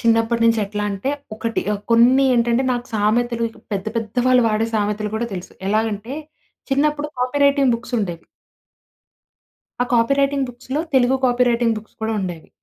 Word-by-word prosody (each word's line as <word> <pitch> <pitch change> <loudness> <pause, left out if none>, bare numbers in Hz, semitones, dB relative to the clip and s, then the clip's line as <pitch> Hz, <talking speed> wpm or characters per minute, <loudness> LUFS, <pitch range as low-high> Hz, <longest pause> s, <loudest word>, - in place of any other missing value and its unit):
చిన్నప్పటి 230 0 +2
నుంచి 230 -1 +4
ఎట్లా 210 +1 -4
అంటే 200 +8 -2 0.2
ఒకటి 225 +1 -2 0.3
కొన్ని 250 +4 +5
ఏంటంటే 235 +2 +2
నాకు 245 0 -3
సామెతలు 230 +2 +1 0.3
పెద్ద, 195 +1 -2
పెద్ద 225 0 -3
వాళ్ళు 255 -1 +5
వాడే 215 +1 +1
సామెతలు 210 0 -1
కూడా 235 - -2
తెలుసు. 180 0 -7 0.2
ఎలాగంటే 215 +2 -1 0.6
చిన్నప్పుడు 295 +2 +1
కాపీ 250 +3 0
రైటింగ్ 280 -3 +4
బుక్స్ 245 +1 -6
ఉండేవి. 175 -5 -4 1.6
ఆ - - +1
copy 230 +3 +3
writing 275 -1 +1
బుక్స్‌లొ 260 +4 -4
Telugu 260 0 +4
copy 250 0 +3
writing 235 -1 +2
books 215 - -17
కూడా 220 0 0
ఉండేవి. 175 -4 -6
235 Hz, 150 wpm, -20 LUFS, 215-255 Hz, 1.6 s, కొన్ని